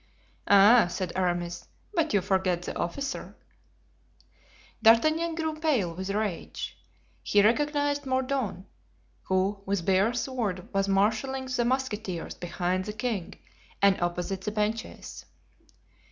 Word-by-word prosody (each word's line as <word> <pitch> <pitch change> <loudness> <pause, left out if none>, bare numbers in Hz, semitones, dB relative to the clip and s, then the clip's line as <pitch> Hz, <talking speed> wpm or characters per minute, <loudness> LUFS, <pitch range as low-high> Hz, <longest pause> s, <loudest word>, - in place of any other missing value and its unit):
"Ah!" 205 +2 +7
said 180 0 -4
Aramis, 175 -2 -1 0.3
"but 330 -4 +1
you 205 - +3
forget 185 -2 0
the - - -5
officer." 270 +11 -4 1.5
D'Artagnan 310 +9 +4
grew 320 -1 -1
pale 255 - +1
with 190 +3 -5
rage. 205 -3 -3 0.5
He 205 -1 +3
recognized 290 +4 +1
Mordaunt, 260 -8 -1 0.6
who 190 +2 0
with 195 -4 -1
bare 195 +5 +3
sword 230 -8 -2
was 195 0 +1
marshalling 220 +7 +1
the 250 -2 -1
musketeers 225 -8 -2
behind 180 +1 -2
the 210 - -4
king 215 -4 -3 0.4
and 200 -2 +4
opposite 180 +2 -2
the 210 - -3
benches. 215 +2 -3
205 Hz, 115 wpm, -28 LUFS, 185-260 Hz, 1.5 s, Ah